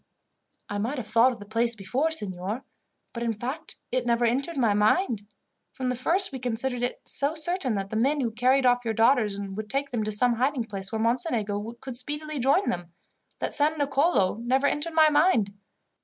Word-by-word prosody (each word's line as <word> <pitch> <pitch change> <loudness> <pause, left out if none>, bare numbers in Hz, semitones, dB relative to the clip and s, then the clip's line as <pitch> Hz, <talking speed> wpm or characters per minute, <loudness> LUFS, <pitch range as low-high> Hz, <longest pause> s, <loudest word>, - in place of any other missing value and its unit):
"I 205 - -3
might 240 +8 -2
have 245 - -4
thought 230 +4 +4
of - - -10
the 205 - -11
place 230 +2 +2
before, 235 +10 -1
signor; 205 - -2 0.5
but, 235 - -5
in 230 -1 0
fact, 260 +9 -6 0.2
it 255 -1 0
never 240 0 +1
entered 270 +7 0
my 230 -5 +3
mind. 210 - +1 0.5
From 260 -4 -3
the 250 - -1
first, 350 +10 +1
we 265 - -6
considered 245 +1 -2
it 245 - -2
so 285 +3 +1
certain 315 - -1
that 195 0 -4
the - - -3
men 275 +7 +2
who 240 -4 -1
carried 255 +3 +2
off 245 0 +3
your 225 -2 -2
daughters 225 -3 +3
would 200 +2 -6
take 275 +2 -2
them 235 -3 -1
to 215 - -2
some 240 +4 +3
hiding 260 0 +1
place 195 -3 -5
where 220 - -2
Mocenigo 230 - -1
could 260 -3 -7
speedily 295 +3 -5
join 280 +10 +2
them, 175 -1 -6 0.5
that - - -3
San 305 +2 +2
Nicolo 280 - +2
never 255 +4 +1
entered 310 +3 0
my 310 -1 +6
mind. 290 - +3
245 Hz, 200 wpm, -26 LUFS, 220-280 Hz, 0.5 s, my